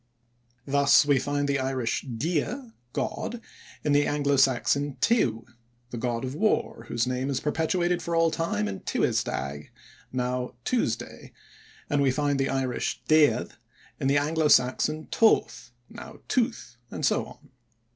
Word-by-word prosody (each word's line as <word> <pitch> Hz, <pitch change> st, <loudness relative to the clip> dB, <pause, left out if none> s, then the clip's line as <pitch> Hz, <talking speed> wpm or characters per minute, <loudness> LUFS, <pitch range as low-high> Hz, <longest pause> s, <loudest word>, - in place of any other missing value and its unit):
Thus 140 Hz, +1 st, +4 dB
we 145 Hz, -2 st, +3 dB
find 145 Hz, +2 st, -1 dB
the 140 Hz, -1 st, +1 dB
Irish 130 Hz, -3 st, -1 dB
dia 165 Hz, -, -3 dB, 0.2 s
(god) 240 Hz, -, -3 dB, 0.4 s
in 150 Hz, -, +1 dB
the 145 Hz, 0 st, +3 dB
Anglo 145 Hz, -1 st, +1 dB
Saxon 135 Hz, +1 st, +2 dB
tiw, 120 Hz, -, +1 dB, 0.5 s
the 120 Hz, -, -5 dB
god 120 Hz, 0 st, -2 dB
of 130 Hz, -, -4 dB
war, 155 Hz, -, 0 dB
whose 120 Hz, -1 st, 0 dB
name 130 Hz, +2 st, -2 dB
is 135 Hz, -, -1 dB
perpetuated 175 Hz, +3 st, 0 dB
for 170 Hz, +1 st, -2 dB
all 165 Hz, 0 st, +3 dB
time 130 Hz, -12 st, -1 dB
in 95 Hz, -1 st, -5 dB
Tiwes -, -, 0 dB
däg, 70 Hz, +2 st, -5 dB, 0.4 s
now 125 Hz, -1 st, -2 dB
"Tuesday", 250 Hz, -2 st, -2 dB, 0.5 s
and 145 Hz, -2 st, +1 dB
we 140 Hz, -, +3 dB
find 145 Hz, +1 st, 0 dB
the 135 Hz, -, +1 dB
Irish 130 Hz, -2 st, -2 dB
déad 155 Hz, -2 st, +4 dB, 0.5 s
in -, -, 0 dB
the 140 Hz, +1 st, +3 dB
Anglo 155 Hz, +2 st, +1 dB
Saxon 150 Hz, +4 st, +2 dB
"toth", 120 Hz, -, +2 dB, 0.2 s
now -, -, -11 dB
"tooth", 230 Hz, -, -1 dB
and 150 Hz, -, -3 dB
so -, -, +1 dB
on. 145 Hz, -, -16 dB
140 Hz, 145 wpm, -26 LUFS, 125-155 Hz, 0.5 s, Thus